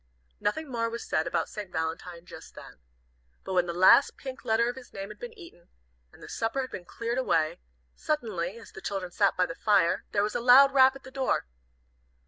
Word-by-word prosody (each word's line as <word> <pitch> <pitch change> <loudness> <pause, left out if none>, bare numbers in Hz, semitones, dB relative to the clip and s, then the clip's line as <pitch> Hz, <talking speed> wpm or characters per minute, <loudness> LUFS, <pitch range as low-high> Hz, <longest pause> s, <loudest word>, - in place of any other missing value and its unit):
Nothing 315 +9 -2
more 230 -3 -2
was 235 +1 -6
said 160 +1 0
about - - -1
St. 205 -3 -8
Valentine 165 +2 -4
just - - -12
then. - - -12 0.6
But 190 - -5
when 180 -1 +2
the - - -2
last 185 +10 +5
pink 265 -1 -8
letter 225 +1 +2
of 245 - -3
his 260 -2 -12
name 195 0 -7
had 210 - -11
been 475 -2 -9
eaten, 340 - -15 0.4
and - - -17
the - - -9
supper 230 +4 -2
had 255 - -6
been 175 - -7
cleared 235 +6 -3
away, 160 - 0 0.3
suddenly, 215 - -3
as 230 - -13
the 190 - -11
children 190 -3 -4
sat 200 +2 +2
by 180 - +3
the 165 - -6
fire, 190 -2 +2
there 200 - +1
was 210 - -2
a 240 - -2
loud 265 +3 +7
rap 265 -1 +6
at 275 - -12
the 260 - -12
door. 265 - 0
220 Hz, 215 wpm, -28 LUFS, 180-260 Hz, 0.6 s, loud